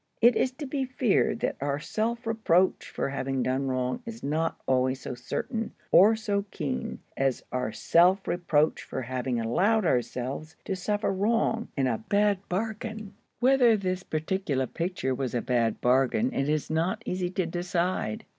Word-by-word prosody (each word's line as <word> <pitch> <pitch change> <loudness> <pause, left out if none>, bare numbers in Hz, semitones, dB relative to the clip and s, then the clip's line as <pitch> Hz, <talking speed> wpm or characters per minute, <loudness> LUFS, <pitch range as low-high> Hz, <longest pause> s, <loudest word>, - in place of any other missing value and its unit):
It 240 +1 +6
is 260 - +2
to 290 +3 -6
be 270 0 -2
feared 255 -4 +1
that - - -1
our 140 0 -1
self 230 +8 -2
reproach 205 -5 +2
for - - -2
having 135 -1 -2
done 130 +2 0
wrong 130 - -1
is 230 -1 -8
not 160 +3 -1
always 130 0 +1
so - - -5
certain, 225 - -4 0.2
or 210 +5 +7
so 205 -2 -1
keen, 145 -8 -3 0.2
as 135 -2 0
our 125 -3 -1
self 180 - +3
reproach 160 -3 +1
for - - -5
having 125 0 -2
allowed 190 - +2
ourselves 130 +3 -1
to 195 - -2
suffer 205 +2 -1
wrong—in 220 - 0
a 115 -4 0
bad 205 -1 +3
bargain. 215 +1 -4 0.3
Whether 250 -3 +5
this 185 -2 -2
particular 155 -5 -1
picture 165 -3 -2
was 130 -2 -3
a 120 - +1
bad 120 -3 +1
bargain 135 - +2
it 135 -6 0
is 155 0 -1
not 180 +8 0
easy 180 -1 -1
to 185 0 -1
decide. 175 -7 -2
175 Hz, 160 wpm, -27 LUFS, 135-220 Hz, 0.3 s, or